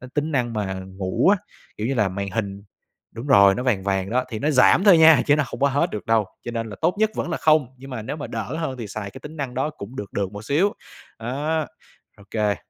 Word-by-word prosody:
Ơ, 130 Hz, -, -10 dB
tính 150 Hz, +2 st, -1 dB
năng 120 Hz, -4 st, 0 dB
mà 100 Hz, -3 st, -2 dB
ngủ 95 Hz, -, 0 dB
á, 205 Hz, -, +6 dB, 0.4 s
kiểu 110 Hz, -, -2 dB
như 135 Hz, -, 0 dB
là 105 Hz, -6 st, +2 dB
màn 100 Hz, +1 st, -4 dB
hình 100 Hz, -1 st, -3 dB, 0.5 s
đúng 115 Hz, +4 st, -7 dB
rồi, 100 Hz, -8 st, +6 dB
nó 125 Hz, -, -2 dB
vàng 115 Hz, -7 st, +1 dB
vàng 95 Hz, -1 st, -1 dB
đó, 125 Hz, +2 st, +1 dB
thì 110 Hz, -, -4 dB
nó 150 Hz, +7 st, 0 dB
giảm 150 Hz, +7 st, +5 dB
thôi 190 Hz, -5 st, +7 dB
nha, 160 Hz, -4 st, +7 dB
chứ 145 Hz, 0 st, +5 dB
nó 150 Hz, -, +1 dB
không -, -, -8 dB
có 140 Hz, -, +4 dB
hết 145 Hz, +6 st, +1 dB
được 105 Hz, -, -6 dB
đâu, 110 Hz, -2 st, +2 dB, 0.2 s
cho -, -, -4 dB
nên 115 Hz, -2 st, -4 dB
là 100 Hz, -, -8 dB
tốt 165 Hz, +3 st, +2 dB
nhất 220 Hz, 0 st, +3 dB
vẫn 175 Hz, -, -2 dB
là 165 Hz, -, -1 dB
không, 155 Hz, -5 st, +3 dB
nhưng 135 Hz, +1 st, -11 dB
mà 115 Hz, -4 st, -5 dB
nếu 130 Hz, -, -5 dB
mà 145 Hz, -, -5 dB
đỡ 120 Hz, +6 st, -4 dB
hơn 135 Hz, -6 st, -3 dB
thì 115 Hz, -, -5 dB
xài 100 Hz, -1 st, -6 dB
cái 130 Hz, -, -11 dB
tính 150 Hz, +3 st, -10 dB
năng 135 Hz, -4 st, -4 dB
đó 135 Hz, +4 st, -1 dB
cũng 125 Hz, -3 st, -10 dB
được 100 Hz, -, -6 dB
được 100 Hz, -1 st, -2 dB
một 105 Hz, +1 st, -8 dB
xíu, 165 Hz, -, +2 dB, 0.5 s
á, 145 Hz, +7 st, -2 dB, 0.5 s
OK. 105 Hz, 0 st, -1 dB
125 Hz, 265 wpm, -23 LUFS, 105-150 Hz, 0.5 s, thôi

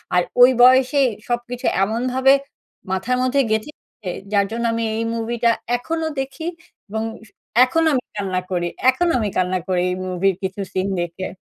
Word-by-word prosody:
আর 180 Hz, -, +5 dB, 0.2 s
ঐ -, -, +12 dB, 0.2 s
বয়সেই 260 Hz, +2 st, +5 dB, 0.2 s
সবকিছু 240 Hz, +1 st, -3 dB, 0.2 s
এমনভাবে 255 Hz, +5 st, +2 dB, 0.6 s
মাথার 230 Hz, +7 st, 0 dB
মধ্যে 260 Hz, +2 st, +2 dB
গেঁথে 220 Hz, +7 st, -1 dB
গেছে, 200 Hz, -6 st, -11 dB, 0.2 s
যার 200 Hz, -1 st, +3 dB
জন্য 235 Hz, +1 st, -3 dB
আমি 230 Hz, -, -1 dB
এই 230 Hz, -, -1 dB
মুভিটা 235 Hz, +1 st, 0 dB, 0.3 s
এখনও 320 Hz, +5 st, -3 dB
দেখি, 270 Hz, +4 st, -5 dB, 0.4 s
এবং 220 Hz, +2 st, -2 dB, 0.2 s
স -, -, -22 dB, 0.4 s
এখনো 325 Hz, +6 st, +1 dB
আমি 255 Hz, -2 st, 0 dB
কান্না 190 Hz, -3 st, -1 dB
করি 175 Hz, -1 st, 0 dB, 0.2 s
এখনো 340 Hz, +7 st, +2 dB
আমি 215 Hz, -2 st, -1 dB
কান্না 185 Hz, 0 st, +1 dB
করি 180 Hz, -1 st, +1 dB
এই -, -, -1 dB
মুভির 185 Hz, +1 st, +1 dB
কিছু 190 Hz, +1 st, -3 dB
সিন 185 Hz, +1 st, 0 dB
দেখে। 175 Hz, +2 st, -4 dB
230 Hz, 165 wpm, -21 LUFS, 190-260 Hz, 0.6 s, ঐ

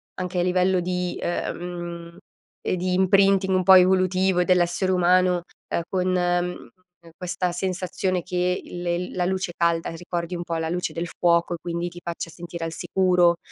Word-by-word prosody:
anche 180 Hz, 0 st, -3 dB
a -, -, +2 dB
livello 180 Hz, 0 st, +2 dB
di, 180 Hz, 0 st, -2 dB
mhmm, 175 Hz, -1 st, -4 dB, 0.4 s
e -, -, -1 dB
di 180 Hz, 0 st, -1 dB
imprinting 190 Hz, 0 st, +3 dB
un 185 Hz, -, +2 dB
po' 190 Hz, 0 st, +8 dB
evolutivo 185 Hz, 0 st, +4 dB
dell'essere 180 Hz, +1 st, +2 dB
umano, 180 Hz, 0 st, +3 dB, 0.3 s
ehm, -, -, 0 dB
con 185 Hz, -1 st, 0 dB
ehm, 175 Hz, 0 st, -1 dB, 0.5 s
questa 180 Hz, 0 st, -2 dB
sensazione 185 Hz, 0 st, -2 dB
che 180 Hz, +1 st, -1 dB
il 175 Hz, 0 st, -8 dB
il 175 Hz, +1 st, -2 dB
la 180 Hz, -, 0 dB
luce 185 Hz, -1 st, -2 dB
calda 170 Hz, -1 st, +1 dB
ricordi 170 Hz, +1 st, -4 dB
un 175 Hz, -, -4 dB
po' 165 Hz, 0 st, -4 dB
la 160 Hz, 0 st, -2 dB
luce 180 Hz, +1 st, -2 dB
del 170 Hz, +1 st, -4 dB
fuoco 170 Hz, 0 st, +1 dB
e -, -, -3 dB
quindi 170 Hz, 0 st, -3 dB
ti 175 Hz, 0 st, -10 dB
faccia 170 Hz, -1 st, -5 dB
sentire 170 Hz, 0 st, -7 dB
al 165 Hz, -, -5 dB
sicuro. 180 Hz, -2 st, +2 dB
180 Hz, 170 wpm, -24 LUFS, 175-185 Hz, 0.5 s, po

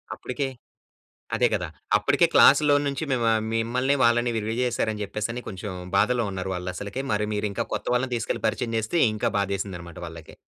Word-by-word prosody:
అప్పటికే 135 Hz, +2 st, -3 dB, 0.9 s
అదే -, -, +3 dB
కదా! -, -, -1 dB, 0.3 s
అప్పటికే -, -, +3 dB
క్లాస్‌లో 145 Hz, +1 st, +6 dB
నుంచి 140 Hz, +2 st, -2 dB
మిమ్మ 120 Hz, -2 st, +2 dB, 0.2 s
మిమ్మల్ని 125 Hz, +4 st, +1 dB
వాళ్ళని 120 Hz, 0 st, +3 dB
విరివి 110 Hz, +1 st, -2 dB
చేశారని 110 Hz, -3 st, -1 dB
చెప్పేసని 110 Hz, +4 st, -3 dB
కొంచెం 100 Hz, +1 st, -6 dB, 0.3 s
బాధలో 120 Hz, +3 st, +3 dB
ఉన్నారు 95 Hz, 0 st, -4 dB
వాళ్ళు 90 Hz, 0 st, -4 dB
అసలకే. 105 Hz, +7 st, -4 dB
మరి 105 Hz, 0 st, +1 dB
మీరు 105 Hz, 0 st, -1 dB
ఇంకా -, -, -2 dB
కొత్త -, -, -4 dB
వాళ్ళని 125 Hz, 0 st, 0 dB
తీసుకెళ్ళి 115 Hz, -, -3 dB
పరిచయం 115 Hz, -2 st, -2 dB
చేస్తే 110 Hz, +10 st, -1 dB
ఇంకా 110 Hz, -, -1 dB
బాధేసిందన్నమాట 95 Hz, -4 st, -3 dB
వాళ్ళకి. 80 Hz, -1 st, -11 dB
115 Hz, 160 wpm, -25 LUFS, 100-125 Hz, 0.9 s, క్లాస్‌లో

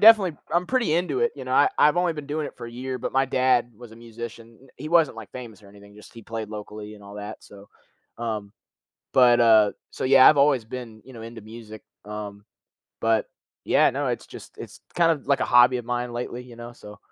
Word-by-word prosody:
definitely 205 Hz, -8 st, +7 dB, 0.2 s
I'm 175 Hz, +1 st, +1 dB
pretty 250 Hz, -10 st, +1 dB
into 180 Hz, -, 0 dB
it, 475 Hz, -1 st, +1 dB
you -, -, -8 dB
know, -, -, -3 dB
I -, -, +5 dB
I've 150 Hz, +3 st, +5 dB
only 175 Hz, -1 st, +2 dB
been 150 Hz, -2 st, -8 dB
doing 150 Hz, +1 st, -3 dB
it -, -, -10 dB
for 120 Hz, -, -7 dB
a 115 Hz, -, -9 dB
year, 130 Hz, +1 st, -5 dB
but -, -, -4 dB
my 135 Hz, 0 st, +3 dB
dad 130 Hz, -2 st, +1 dB
was 120 Hz, +1 st, -13 dB
a -, -, -13 dB
musician. 115 Hz, +1 st, -10 dB
He 155 Hz, +4 st, -7 dB
wasn't 165 Hz, -8 st, +3 dB
like 110 Hz, -3 st, -10 dB
famous 115 Hz, -5 st, -10 dB
or 100 Hz, -, -16 dB
anything, 100 Hz, 0 st, -17 dB
just 105 Hz, -, -15 dB
he 115 Hz, -, -11 dB
played 110 Hz, 0 st, -6 dB
locally 105 Hz, 0 st, -8 dB
and 105 Hz, -, -16 dB
all 100 Hz, 0 st, -12 dB
that, 105 Hz, +1 st, -8 dB
so, 100 Hz, 0 st, -15 dB, 0.5 s
um, 110 Hz, -3 st, -4 dB, 0.6 s
but, 120 Hz, -2 st, +6 dB
uh, 110 Hz, -3 st, +6 dB, 0.2 s
so -, -, -4 dB
yeah, 130 Hz, 0 st, +8 dB
I've 150 Hz, -, +3 dB
always 140 Hz, -4 st, +3 dB
been, 115 Hz, -2 st, -8 dB
you 130 Hz, -, -13 dB
know, 115 Hz, -, -10 dB
into 115 Hz, 0 st, -9 dB
music, 110 Hz, 0 st, -11 dB, 0.2 s
um, 105 Hz, -1 st, -8 dB, 0.6 s
but 115 Hz, -1 st, +2 dB, 0.4 s
yeah, -, -, +4 dB
no, -, -, -3 dB
it's -, -, -4 dB
just, -, -, -12 dB
it's -, -, -10 dB, 0.2 s
kind 170 Hz, -1 st, +4 dB
of 150 Hz, -5 st, -3 dB
like 140 Hz, -1 st, +2 dB
a -, -, 0 dB
hobby 125 Hz, +1 st, +5 dB
of 120 Hz, -, -7 dB
mine 120 Hz, 0 st, -3 dB
lately, 120 Hz, +1 st, -5 dB
you 125 Hz, -1 st, -13 dB
know, 120 Hz, +1 st, -9 dB
so 105 Hz, -3 st, -13 dB
120 Hz, 230 wpm, -24 LUFS, 110-135 Hz, 0.6 s, yeah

